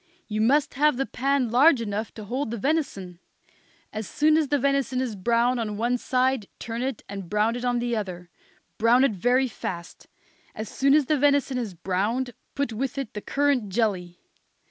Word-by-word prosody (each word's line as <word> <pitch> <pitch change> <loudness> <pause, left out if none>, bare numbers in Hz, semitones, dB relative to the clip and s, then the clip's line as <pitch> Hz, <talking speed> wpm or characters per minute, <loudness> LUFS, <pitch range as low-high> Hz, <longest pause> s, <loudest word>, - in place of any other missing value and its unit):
You 215 0 -2
must 275 +6 +3
have 295 0 +3
the 270 - 0
pan 270 -3 0
large 270 +3 +6
enough 215 -1 -3
to 215 - -7
hold 250 +5 -3
the 235 - -3
venison. 205 - -2 0.7
As 215 -2 -4
soon 305 +1 +3
as 315 -2 +2
the 290 - +2
venison 275 -1 +1
is 250 -4 -2
brown 235 +5 +1
on 210 -3 -3
one 240 +3 0
side 255 -4 +1
turn 230 +1 -5
it 260 -2 -3
and 195 -3 -7
brown 210 +3 +1
it 245 - -5
on 245 -1 +1
the 240 0 -1
other. 180 -5 -5 0.5
Brown 235 +3 +5
it 275 - +4
very 245 +7 +2
fast. 175 -6 -7 0.5
As 215 0 -5
soon 275 +1 +3
as 300 -2 +4
the 300 +1 +1
venison 280 -2 +2
is 215 -7 -5
browned 210 +9 -1 0.2
put 280 -4 -1
with 260 +4 -3
it 270 -5 -4
the 210 - -5
currant 275 -6 +1
jelly. 185 -5 -1
240 Hz, 190 wpm, -25 LUFS, 210-270 Hz, 0.7 s, large